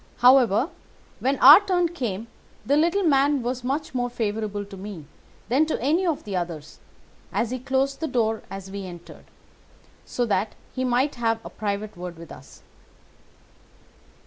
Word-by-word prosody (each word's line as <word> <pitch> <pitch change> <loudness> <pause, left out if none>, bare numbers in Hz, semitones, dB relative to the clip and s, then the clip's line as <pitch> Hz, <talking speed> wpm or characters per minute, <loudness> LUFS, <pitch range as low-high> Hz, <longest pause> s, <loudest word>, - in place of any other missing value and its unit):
However, 250 - +5 0.5
when 270 +2 0
our 285 +7 +10
turn 360 -3 +1
came 230 - -4 0.4
the 280 - +2
little 340 +6 +2
man 280 -3 +3
was 245 +1 -3
much 275 +4 -2
more 245 -1 -1
favourable 215 -3 -3
to 200 0 -11
me 190 -5 -8 0.4
than 270 +7 +2
to 315 - -1
any 320 +9 +1
of 320 -4 -1
the 200 -2 -5
others, 170 -4 -5 0.5
and 235 - 0
he 255 +3 -4
closed 270 +2 -1
the 320 - -2
door 225 -5 0
as 195 0 -8
we 200 0 -5
entered, 175 -1 -12 0.8
so 245 - -2
that 205 -1 -1 0.2
he 260 - -2
might 255 +3 +1
have 225 -1 +1
a - - -8
private 210 0 -4
word 175 -1 -7
with 165 0 -11
us. 135 - -14
240 Hz, 160 wpm, -24 LUFS, 200-275 Hz, 0.8 s, our